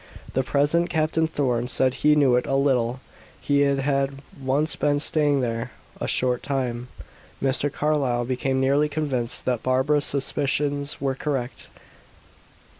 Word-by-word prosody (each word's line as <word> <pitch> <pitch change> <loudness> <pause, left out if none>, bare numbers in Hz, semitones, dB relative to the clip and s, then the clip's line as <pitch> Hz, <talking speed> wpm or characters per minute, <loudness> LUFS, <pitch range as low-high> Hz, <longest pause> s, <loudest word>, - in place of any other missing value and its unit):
The 130 - +2
present 145 +6 +1
Captain 160 0 +1
Thorn 125 -6 -1
said 130 0 +2
he 150 +2 +3
knew 140 -4 +4
it 125 - 0
"a 135 - 0
little," 130 -3 +1 0.4
he 145 0 +1
had 140 0 0 0.2
once 145 +4 +1
been 145 0 +1
"staying 145 -2 +2
there 115 0 -2 0.3
a - - -3
short 125 -1 0
time." 125 -3 -3 0.5
Mr. 135 +2 0
Carlyle 135 -5 0
became 130 +1 -1
nearly 140 +3 +2
convinced 135 -6 -1
that 125 -3 0
Barbara's 130 +3 +2
suspicions 145 +1 -1
were 135 -1 -1
correct. 130 -2 -3
135 Hz, 135 wpm, -24 LUFS, 130-145 Hz, 0.5 s, knew